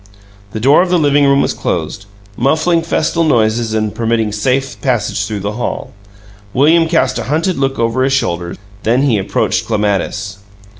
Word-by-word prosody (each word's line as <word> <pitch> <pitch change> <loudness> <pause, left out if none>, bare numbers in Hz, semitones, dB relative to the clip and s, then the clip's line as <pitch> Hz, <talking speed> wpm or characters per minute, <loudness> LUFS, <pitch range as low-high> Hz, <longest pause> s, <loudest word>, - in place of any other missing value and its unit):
The 110 - -3
door 140 +8 +5
of 185 - 0
the 180 - +3
living 145 -2 +3
room 140 0 +3
was - - -1
closed, 100 - -4 0.3
muffling 155 +7 +1
festal 165 0 0
noises 115 -5 +1
and 110 -1 -1
permitting 115 -2 0
safe 130 +5 -1
passage 105 -6 -1
through 105 -2 -4
the 100 +2 -3
hall. - - -4 0.6
William 160 +5 +4
cast 160 -6 +1
a - - -4
hunted 160 +6 -1
look 135 0 -1
over 115 +2 0
his 135 - +1
shoulder; 85 -10 -1 0.3
then 120 +5 +1
he 120 -7 +2
approached 95 - -1
Clematis. 100 -1 -2
125 Hz, 165 wpm, -15 LUFS, 110-145 Hz, 0.6 s, door